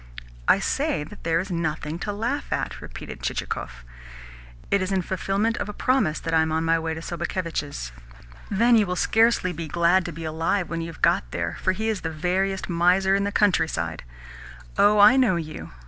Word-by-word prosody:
"I -, -, +6 dB
say 150 Hz, -, -1 dB
that 180 Hz, +8 st, -12 dB
there 165 Hz, 0 st, +1 dB
is 190 Hz, +2 st, -4 dB
nothing 160 Hz, -1 st, -2 dB
to 205 Hz, -, -3 dB
laugh 235 Hz, +8 st, -3 dB
at," -, -, -2 dB
repeated -, -, -9 dB
Chichikov. 65 Hz, +1 st, -4 dB, 0.9 s
"It 200 Hz, -, +3 dB
is 185 Hz, +1 st, -2 dB
in 190 Hz, -2 st, +1 dB
fulfilment 200 Hz, +5 st, -1 dB
of -, -, -3 dB
a -, -, -5 dB
promise 220 Hz, -12 st, +1 dB
that 165 Hz, -, -3 dB
I 160 Hz, -, +5 dB
am 160 Hz, 0 st, 0 dB
on 160 Hz, +1 st, 0 dB
my 165 Hz, 0 st, +3 dB
way 160 Hz, 0 st, -3 dB
to 160 Hz, -, -6 dB
Sobakevitch's." 165 Hz, -, -4 dB, 0.6 s
"Then 235 Hz, +4 st, +4 dB
you 215 Hz, -3 st, +4 dB
will 180 Hz, -, -2 dB
scarcely 225 Hz, -2 st, +2 dB
be 165 Hz, 0 st, -5 dB
glad 170 Hz, +4 st, +3 dB
to 170 Hz, -, -4 dB
be 165 Hz, +1 st, -8 dB
alive 165 Hz, +3 st, -1 dB
when 165 Hz, 0 st, -2 dB
you've 165 Hz, -1 st, -8 dB
got -, -, +3 dB
there, 85 Hz, +5 st, -3 dB
for 185 Hz, -, +2 dB
he 220 Hz, +4 st, -3 dB
is 215 Hz, -5 st, -1 dB
the 160 Hz, -, -3 dB
veriest 185 Hz, +4 st, -1 dB
miser 180 Hz, +2 st, +3 dB
in 200 Hz, 0 st, +2 dB
the 200 Hz, -, -1 dB
countryside. 120 Hz, -, +1 dB, 0.7 s
Oh, 210 Hz, +1 st, +5 dB
I 210 Hz, +6 st, +7 dB
know 245 Hz, -8 st, +4 dB
you. 155 Hz, -2 st, -6 dB
175 Hz, 195 wpm, -24 LUFS, 160-200 Hz, 0.9 s, I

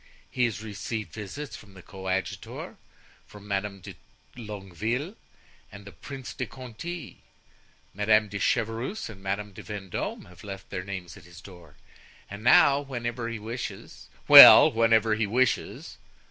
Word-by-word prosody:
He 125 Hz, -, +1 dB
has 110 Hz, -3 st, -4 dB
received 105 Hz, 0 st, -6 dB
visits 110 Hz, +4 st, -7 dB
from 100 Hz, -4 st, -15 dB
the 95 Hz, -, -14 dB
coadjutor, 95 Hz, 0 st, -5 dB, 0.5 s
from 105 Hz, 0 st, -14 dB
Madame 100 Hz, 0 st, -3 dB
de -, -, -10 dB, 0.4 s
Longueville, 110 Hz, -, -5 dB, 0.6 s
and 100 Hz, 0 st, -12 dB
the 100 Hz, -, -11 dB
Prince 135 Hz, -2 st, -9 dB
de 130 Hz, -, -5 dB
Conti; 130 Hz, +6 st, -9 dB, 0.7 s
Madame 105 Hz, +2 st, +2 dB
de 100 Hz, 0 st, -6 dB
Chevreuse 115 Hz, -, -2 dB
and 95 Hz, -3 st, -14 dB
Madame 100 Hz, +1 st, -4 dB
de -, -, -10 dB
Vendome 100 Hz, -3 st, -6 dB
have 90 Hz, -1 st, -17 dB
left 95 Hz, -2 st, -9 dB
their 90 Hz, -2 st, -4 dB
names 95 Hz, -3 st, -8 dB
at -, -, -16 dB
his 90 Hz, 0 st, -14 dB
door. 90 Hz, -4 st, -15 dB, 0.6 s
And 100 Hz, +1 st, -8 dB
now, 140 Hz, +3 st, +5 dB
whenever 120 Hz, -3 st, -5 dB
he 115 Hz, -, -5 dB
wishes——" 115 Hz, +4 st, -8 dB, 0.2 s
"Well, -, -, +11 dB
whenever 115 Hz, -1 st, +2 dB
he 110 Hz, 0 st, -1 dB
wishes?" 125 Hz, +4 st, -1 dB
105 Hz, 145 wpm, -26 LUFS, 100-120 Hz, 0.7 s, Well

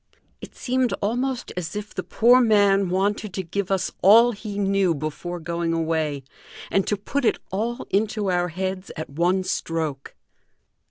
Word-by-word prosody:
It -, -, -11 dB
seemed 255 Hz, -1 st, 0 dB
almost 245 Hz, +4 st, -2 dB
as 180 Hz, +1 st, -5 dB
if 210 Hz, 0 st, -6 dB
the -, -, -3 dB
poor 245 Hz, +3 st, +4 dB
man 200 Hz, -4 st, +4 dB
wanted 195 Hz, +1 st, -1 dB
to 190 Hz, -, -2 dB
give 190 Hz, +3 st, -3 dB
us 190 Hz, -1 st, 0 dB
all 230 Hz, +5 st, +7 dB
he 210 Hz, -2 st, -7 dB
knew 195 Hz, -3 st, +2 dB
before 155 Hz, +4 st, -5 dB
going 170 Hz, 0 st, -2 dB
away, 160 Hz, -4 st, -1 dB, 0.5 s
and 195 Hz, -, +1 dB
to 205 Hz, -, 0 dB
put 280 Hz, +7 st, -3 dB
it 230 Hz, -, +2 dB
all 230 Hz, +6 st, -2 dB
into 205 Hz, -1 st, 0 dB
our 175 Hz, 0 st, +1 dB
heads 185 Hz, +2 st, -4 dB
at 155 Hz, -2 st, -6 dB
one 175 Hz, +5 st, +1 dB
stroke. 160 Hz, -6 st, -3 dB
195 Hz, 160 wpm, -23 LUFS, 170-210 Hz, 0.5 s, all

